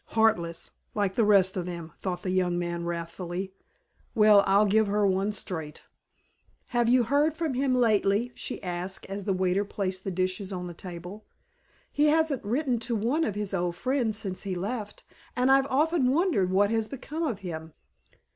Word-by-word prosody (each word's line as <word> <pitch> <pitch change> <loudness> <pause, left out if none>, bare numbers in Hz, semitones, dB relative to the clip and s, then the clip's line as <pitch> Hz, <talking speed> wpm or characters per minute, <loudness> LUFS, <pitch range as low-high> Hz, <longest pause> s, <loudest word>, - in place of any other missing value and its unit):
"Heartless, 210 -7 +1 0.2
like 205 -2 +1
all - - -21
the 230 - +4
rest 195 -2 +4
of 180 -2 -3
them," 170 -2 -6
thought 180 -2 -4
the 185 - -1
young 180 -1 +1
man 170 -1 -3
wrathfully. 175 +2 -4 0.6
"Well, 210 -2 +7
I'll 200 +2 +5
give 215 +1 +3
her 205 +1 +2
one 195 +2 +1
straight." 165 -6 -5 0.9
"Have 240 -1 +2
you 250 0 +5
heard 290 +6 +1
from 325 -5 -1
him 260 0 +1
lately?" 220 -1 +2
she - - -6
asked, 180 +1 -4
as 200 0 -5
the 195 - +1
waiter 185 +1 +1
placed 190 -2 -3
the - - -3
dishes 185 +2 -2
on 180 -2 -4
the 175 - -6
table. 180 +4 -9 0.6
"He 295 - +2
hasn't 310 -3 +2
written 245 +3 0
to 235 +1 -2
one 245 +10 +1
of 210 - -1
his 205 -1 -3
old 175 -2 -1
friends 245 -1 0
since 190 -4 -4
he 195 -2 -3
left, 210 +3 -5 0.3
and 250 +2 +3
I've 270 0 +5
often 295 0 +2
wondered 285 - +2
what 200 +3 +3
has 225 -1 0
become 280 +5 -6
of 240 - -2
him." 160 -2 -6
200 Hz, 185 wpm, -27 LUFS, 185-245 Hz, 0.9 s, Well